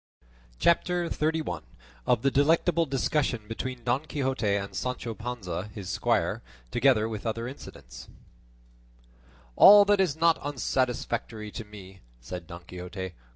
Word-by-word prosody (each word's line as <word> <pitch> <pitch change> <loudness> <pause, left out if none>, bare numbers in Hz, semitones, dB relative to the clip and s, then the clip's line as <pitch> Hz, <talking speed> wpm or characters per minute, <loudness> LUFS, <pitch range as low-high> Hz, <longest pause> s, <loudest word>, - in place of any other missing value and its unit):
CHAPTER 175 0 +2
XXXI. 155 - -1 0.5
OF 120 -3 +3
THE 135 - +3
DELECTABLE 165 +4 +3
DISCUSSION 135 -4 -1
BETWEEN 120 +2 -5
DON 125 +6 0
QUIXOTE 130 -8 0
AND 100 0 -5
SANCHO 125 -2 -3
PANZA, 105 -5 -5
HIS 100 -4 -5
SQUIRE, - - 0 0.3
TOGETHER 125 -5 +3
WITH 110 0 -5
OTHER 115 +1 -2
INCIDENTS 130 - -11 1.5
"All 205 +1 +9
that 205 -1 +4
is 175 -7 +1
not 165 0 +3
unsatisfactory 120 -5 -2
to 115 - -6
me," 95 -3 -12 0.2
said 85 +8 -8
Don 85 0 -9
Quixote. 90 +1 -7
120 Hz, 125 wpm, -27 LUFS, 105-145 Hz, 1.5 s, All